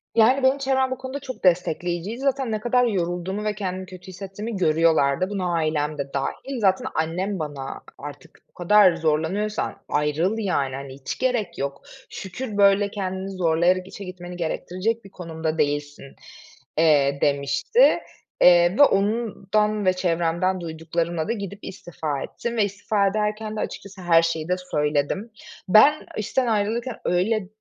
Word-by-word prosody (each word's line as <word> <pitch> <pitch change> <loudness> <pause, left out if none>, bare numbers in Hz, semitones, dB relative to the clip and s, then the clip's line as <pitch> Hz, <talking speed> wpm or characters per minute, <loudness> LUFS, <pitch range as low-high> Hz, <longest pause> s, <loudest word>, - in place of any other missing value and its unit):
Yani, 250 +4 +4
benim 260 +1 +4
çevrem 265 -1 +1
bu 260 - -2
konuda 260 +2 -6
çok 260 -2 -8
destekleyiciydi. 180 +3 0
Zaten 270 -3 0
ne 215 - -1
kadar 245 +3 +2
yorulduğumu 185 -1 -2
ve 210 -1 -1
kendimi 190 -2 -4
kötü 185 0 -12
hissettiğimi 195 +4 -6
görüyorlardı. 160 -1 +2
Buna 185 -4 -2
ailem 155 -2 0
de 140 -1 -5
dâhil. 245 - -3
Zaten 205 +5 +2
annem 180 +5 -1
bana 145 -3 -5 0.2
artık 145 0 -11
"O - - -41
kadar 185 0 +5
zorlanıyorsan 165 +7 -1
ayrıl, 150 +7 +1
yani, 140 -11 -1
hani, 135 -1 -7
hiç 135 0 -6
gerek 235 -9 -1
yok. 140 0 -4 0.3
Şükür, 205 +3 -6
böyle, 200 0 +4
kendini 190 -1 -4
zorlayarak 180 0 +1
işe 200 - -9
gitmeni 180 -1 -8
gerektirecek 185 +7 -2
bir - - -11
konumda 160 -3 -4
değilsin." 145 -1 -2 0.6
eee, 145 -3 +4
demişti. 140 - +3 0.4
Eee, 175 +2 +6
ve - - +10
ondan 210 -2 +1
ve 185 - +4
çevremden 175 +1 0
duyduklarımla 165 0 -3
da 230 - 0
gidip 200 -2 -6
istifa 160 -6 -5
ettim 235 0 -5
ve 215 - +4
istifa 200 0 0
ederken 215 +1 -2
de - - -4
açıkçası 200 -2 -6
her 170 -2 +5
şeyi 165 -1 -2
de 180 - +3 0.2
söyledim. 150 +9 0 0.4
Ben 280 +10 +6
işten 240 +4 0
ayrılırken 225 +3 0
öyle 190 +3 +1
185 Hz, 150 wpm, -23 LUFS, 165-215 Hz, 0.6 s, ve